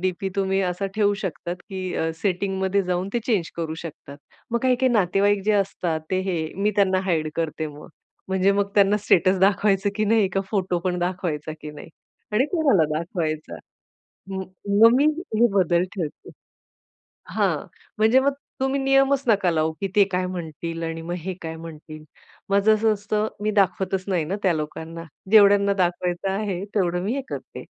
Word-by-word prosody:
DP 185 Hz, +1 st, -1 dB
तुम्ही 195 Hz, 0 st, +1 dB
असा 180 Hz, +2 st, -1 dB
ठेवू 205 Hz, -1 st, +2 dB
शकतात, 175 Hz, -1 st, -4 dB
की 185 Hz, -2 st, -4 dB
अ, 160 Hz, -, 0 dB
सेटिंग 190 Hz, 0 st, -1 dB
मध्ये 190 Hz, +1 st, +1 dB
जाऊन 180 Hz, +1 st, -2 dB
ते 240 Hz, -, +1 dB
चेंज 200 Hz, -9 st, 0 dB
करू 160 Hz, -2 st, -3 dB
शकतात. 145 Hz, -3 st, -10 dB, 0.3 s
मग 235 Hz, -, +1 dB
काही-काही 255 Hz, 0 st, +3 dB
नातेवाईक 200 Hz, 0 st, +2 dB
जे 215 Hz, -, +3 dB
असतात 185 Hz, -5 st, 0 dB
ते 185 Hz, 0 st, +1 dB
हे 180 Hz, -, 0 dB, 0.3 s
मी 210 Hz, -, +3 dB
त्यांना 190 Hz, -2 st, +3 dB
हाईड 155 Hz, -3 st, +1 dB
करते 160 Hz, -1 st, -2 dB
मग 150 Hz, 0 st, -11 dB, 0.4 s
म्हणजे 190 Hz, +1 st, +3 dB
मग 200 Hz, 0 st, 0 dB
त्यांना 200 Hz, 0 st, +5 dB
स्टेटस 185 Hz, +2 st, +4 dB
दाखवायचं 200 Hz, +1 st, +3 dB
की 215 Hz, -, +1 dB
नाही, 215 Hz, -2 st, +3 dB
का 195 Hz, +1 st, -1 dB
फोटो 190 Hz, -4 st, 0 dB
पण 180 Hz, -1 st, 0 dB
दाखवायचा 175 Hz, -4 st, -2 dB
की 150 Hz, -, -7 dB
नाही. 150 Hz, -, -11 dB, 0.4 s
आणि 225 Hz, +5 st, +3 dB
कोणाला 280 Hz, -, +3 dB
दाखवायचा, 160 Hz, -2 st, -3 dB, 0.8 s
म 190 Hz, -, -2 dB, 0.4 s
मग 230 Hz, +1 st, +8 dB
मी 280 Hz, -, +4 dB, 0.3 s
हे 235 Hz, +2 st, +5 dB
बदल 175 Hz, -3 st, +3 dB
ठेवते. 165 Hz, -7 st, -6 dB, 1.0 s
हां, -, -, +1 dB, 0.4 s
म्हणजे 220 Hz, +4 st, +5 dB
मग 275 Hz, +1 st, +1 dB, 0.3 s
तुम्ही 270 Hz, +1 st, 0 dB
नियमच 270 Hz, 0 st, +3 dB
नका 200 Hz, -5 st, +3 dB
लावू, 160 Hz, 0 st, +1 dB
की 195 Hz, -, 0 dB
ते 205 Hz, -, +7 dB
काय 185 Hz, 0 st, 0 dB
म्हणतील 165 Hz, -1 st, -5 dB
आणि 165 Hz, 0 st, -4 dB
मग 175 Hz, +2 st, -5 dB
हे 185 Hz, +3 st, -4 dB
काय 160 Hz, -1 st, -5 dB
म्हणतील, 155 Hz, -1 st, -10 dB, 0.5 s
माझं 200 Hz, +2 st, +4 dB
असं 215 Hz, 0 st, +2 dB
असतं 210 Hz, +1 st, -1 dB, 0.2 s
मी 215 Hz, -, +1 dB
दाखवतच 190 Hz, -1 st, +1 dB
नाही 180 Hz, -5 st, 0 dB
ना 185 Hz, +6 st, -2 dB
त्या 185 Hz, -3 st, +3 dB
लोकांना. 160 Hz, +2 st, -5 dB, 0.3 s
जेवढ्यांना 200 Hz, -2 st, +6 dB
दाखवायचं 175 Hz, +1 st, 0 dB
आहे 195 Hz, -2 st, -2 dB
तेवढं 180 Hz, -3 st, +1 dB
मी 210 Hz, +5 st, -1 dB
हे 275 Hz, -, -2 dB
करते -, -, -7 dB
190 Hz, 175 wpm, -23 LUFS, 170-205 Hz, 1.0 s, मग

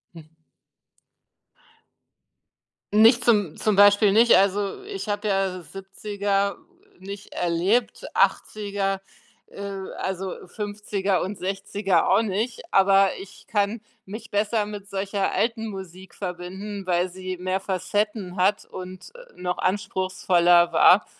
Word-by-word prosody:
Mm. 160 Hz, -2 st, -11 dB, 2.7 s
Nicht 225 Hz, +3 st, +6 dB
zum 205 Hz, -9 st, +2 dB
zum 215 Hz, -2 st, +1 dB
Beispiel 205 Hz, +1 st, +6 dB
nicht, 230 Hz, +2 st, +6 dB
also 200 Hz, -, +1 dB
ich 395 Hz, -, -6 dB
habe 205 Hz, +1 st, -2 dB
ja 195 Hz, -2 st, 0 dB
70er 200 Hz, +1 st, -2 dB, 0.4 s
nicht 200 Hz, +1 st, -9 dB
erlebt, 180 Hz, +7 st, 0 dB
80er, 200 Hz, -2 st, 0 dB, 0.5 s
äh, -, -, -11 dB, 0.4 s
also 190 Hz, 0 st, -4 dB
50er 205 Hz, -1 st, -2 dB
und 195 Hz, +2 st, -5 dB
60er 195 Hz, -1 st, 0 dB
auch 195 Hz, +4 st, +5 dB
nicht, 225 Hz, +3 st, -2 dB
aber 195 Hz, 0 st, +5 dB
ich 195 Hz, 0 st, -13 dB
kann 205 Hz, +1 st, 0 dB, 0.2 s
mich 210 Hz, +4 st, -9 dB
besser 210 Hz, +1 st, 0 dB
mit 205 Hz, -1 st, -8 dB
solcher 195 Hz, 0 st, -2 dB
alten 225 Hz, -1 st, 0 dB
Musik 190 Hz, -2 st, -9 dB
verbinden, 190 Hz, +2 st, -6 dB
weil 180 Hz, 0 st, +1 dB
sie 185 Hz, 0 st, -6 dB
mehr 185 Hz, +1 st, -1 dB
Facetten 195 Hz, 0 st, -2 dB
hat 195 Hz, +3 st, +2 dB
und, 185 Hz, 0 st, -9 dB
äh, -, -, -15 dB
noch 180 Hz, 0 st, -3 dB
anspruchsvoller 185 Hz, -2 st, +2 dB
war 180 Hz, +4 st, +6 dB
195 Hz, 115 wpm, -24 LUFS, 185-210 Hz, 2.7 s, Nicht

